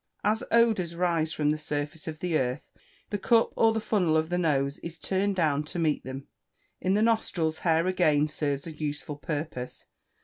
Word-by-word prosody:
As 215 +2 +1
odours 220 -8 +3
arise 170 -3 +1
from 150 -2 +1
the 155 - -2
surface 150 +1 -4
of 155 -1 -6
the 180 -2 0
earth, 130 0 -1 0.4
the 205 - -1
cup 230 +3 +3
or 225 0 +3
funnel 180 -7 +2
of 160 +1 0
the 175 - 0
nose 140 -4 +1
is 170 0 -8
turned 195 +3 0
down 150 -5 +2
to 155 - -7
meet 160 -3 +1
them. 130 +1 -7 0.5
In 190 +1 +1
the 210 - +3
nostrils 180 -8 +1
hair 165 -1 +2
again 155 -5 +3
serves 145 -2 -2
a 165 - -6
useful 150 -1 -4
purpose. 145 -3 -5
160 Hz, 180 wpm, -28 LUFS, 150-185 Hz, 0.5 s, odours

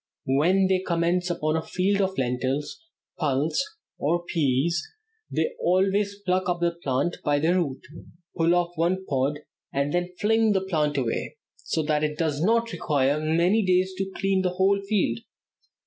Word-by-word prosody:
When 170 +9 +3
they 190 0 +2
commence 175 0 0
upon 155 -2 0
a 160 - 0
field 195 +4 0
of 190 0 -1
lentils, 130 - -2 0.4
pulse, 150 - +1 0.4
or 170 +4 0
peas, 160 +1 +1 0.5
they 485 - 0
always 195 +2 +1
pluck 185 0 +1
up 175 -1 0
the 170 0 +2
plant 170 0 -2
by 145 -1 +2
the 160 +4 +2
root, 160 -8 -1 0.5
pull 170 +1 +3
off 175 -1 +1
one 180 +3 0
pod, 140 +1 -1 0.3
and 140 +1 -1
then 175 0 0
fling 220 0 +3
the 190 - +1
plant 150 -5 0
away, 125 -4 -2 0.2
so 160 - -2
that 150 0 0
it 150 0 -1
does 155 -3 -1
not 230 +5 +2
require 145 -1 +1
many 170 +8 +2
days 185 0 +2
to 195 0 -1
clear 195 -1 +2
a 185 - +2
whole 190 +2 +2
field. 195 - 0
170 Hz, 165 wpm, -25 LUFS, 150-190 Hz, 0.5 s, When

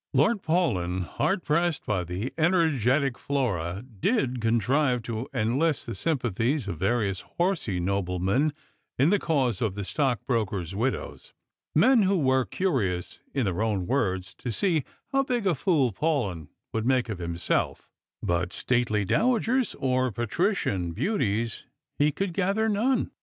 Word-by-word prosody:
Lord 190 - +3
Paulyn, 95 - 0
hard 190 - -1
pressed 165 0 +1
by 95 -4 0
the 90 +9 -4
energetic 150 - +2
Flora, 100 - -1 0.2
did 130 - +1
contrive 125 +3 +2
to 115 +3 -4
enlist 135 +6 +1
the 115 - -4
sympathies 125 - 0
of 85 -6 -4
various 100 -1 0 0.2
horsey 170 - 0
noblemen 95 - 0 0.5
in 140 +7 +4
the 205 - +3
cause 130 - 0
of 105 -4 0
the 100 - -3
stock 135 - -1
brokers' 100 -8 -1
widows 120 +7 -3 0.2
— - - -53
men 255 -3 +6
who 195 0 +3
were 130 -4 +2
curious, 100 - -1 0.2
in 135 -4 +1
their 95 0 -1
own 105 -5 0
word8» 95 -7 -1
to 125 - -4
see 165 - +1 0.3
"how 275 0 +3
big 245 -5 -1
a 185 - +3
fool 140 - +2
Paulyn 105 - -1 0.3
would 110 +1 -1
make 130 -2 +2
of 105 -5 -5
himself 85 0 -1
" - - -66
— - - -66
but 85 +1 0
stately 115 -4 0
dowagers 240 - +1
or 130 -1 +1
patrician 120 - -1
beauties 115 - -1 0.3
he 150 +1 +4
could 195 +4 -3
gather 200 +4 +1
none. 225 +5 +1
125 Hz, 150 wpm, -27 LUFS, 100-165 Hz, 0.5 s, men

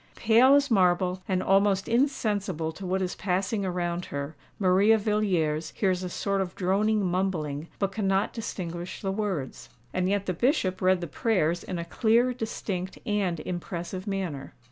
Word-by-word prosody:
Pale 235 +5 +5
as 285 -2 +2
marble, 180 -2 +2
and 185 -1 0
almost 195 0 +3
insensible 205 - 0
to 185 +3 -8
what 190 +1 0
is 180 - -2
passing 195 +2 -1
around 175 -1 -2
her, 140 +2 -5 0.2
Maria 200 +3 +4
Villiers 190 -8 0
hears 185 -3 +1
a 180 - -4
sort 195 +2 -1
of 185 -2 -4
droning 200 +3 +1
mumbling, 170 -5 -1
but 195 -1 0
cannot 195 -1 0
distinguish 175 -6 -5
the 195 - 0
words. 190 -9 -3 0.2
And 185 0 0
yet 200 0 0
the 185 - -1
Bishop 190 - +1
read 185 -1 +3
the - - -2
prayers 175 -1 0
in 180 - -4
a 170 - -4
clear, 230 +7 +2
distinct, 195 -5 -4
and 195 -7 0
impressive 180 +2 -5
manner. 180 -9 -4
190 Hz, 160 wpm, -27 LUFS, 175-210 Hz, 0.2 s, Pale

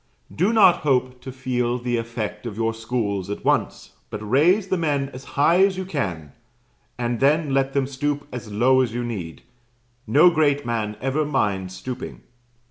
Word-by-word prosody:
Do 185 +7 +2
not 205 -6 +6
hope 130 -3 0
to 130 - -7
feel 125 -1 -1
the 120 -1 -2
effect 115 -1 -4
of 105 -2 -7
your 115 0 0
schools 110 -4 -3
at 100 - -6
once, - - 0 0.2
but 105 0 -6
raise 175 - +3
the 185 - +1
men 145 -4 0
as 130 -1 -10
high 170 +6 +5
as 195 -1 +2
you 190 - -3
can, 95 - -4 0.7
and 120 -1 -2
then 145 +1 +2
let 135 0 +1
them 140 -1 +1
stoop 145 +2 -3
as 115 -4 -7
low 130 +5 +3
as 120 -3 -2
you 120 - -2
need; 95 -9 -6 0.6
no 150 +10 +6
great 145 -3 +1
man 110 -3 -2
ever 135 +4 0
minds 95 -10 -1
stooping. 125 +7 -7
125 Hz, 175 wpm, -23 LUFS, 115-145 Hz, 0.7 s, not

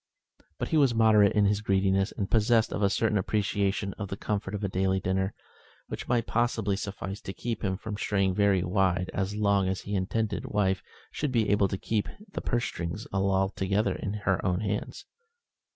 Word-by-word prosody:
But - - -3
he 160 - +2
was 135 -5 +4
moderate 110 -3 +5
in 105 -1 +3
his 100 +1 +2
greediness, 95 0 +2
and 100 -4 -3
possessed 110 +1 +3
of - - -2
a 100 - +4
certain 105 0 +1
appreciation 100 0 0
of 100 - -3
the 100 - -5
comfort 105 -1 -2
of 105 - -5
a - - +1
daily 95 0 +1
dinner, 95 +2 -1 0.5
which - - -6
might 120 -2 +1
possibly 110 -4 0
suffice 100 0 -5
to 95 - -6
keep 115 +1 -4
him 95 -2 0
from 105 +1 -6
straying 95 -2 +1
very 100 -2 +3
wide 90 -1 +1
as 95 +1 -2
long 100 -2 +2
as 95 - -2
his 100 - -4
intended 100 +2 -1
wife 95 -2 +1 0.3
should 150 -3 -2
be 115 -4 +2
able 100 -1 +4
to 95 - -3
keep 105 +1 -1 0.2
the - - -4
purse 120 -1 0
strings 85 +5 -4
altogether 95 +1 +1
in 100 - -4
her 95 -2 +1
own 90 +2 0
hands. 105 -1 -3
100 Hz, 190 wpm, -28 LUFS, 95-105 Hz, 0.5 s, moderate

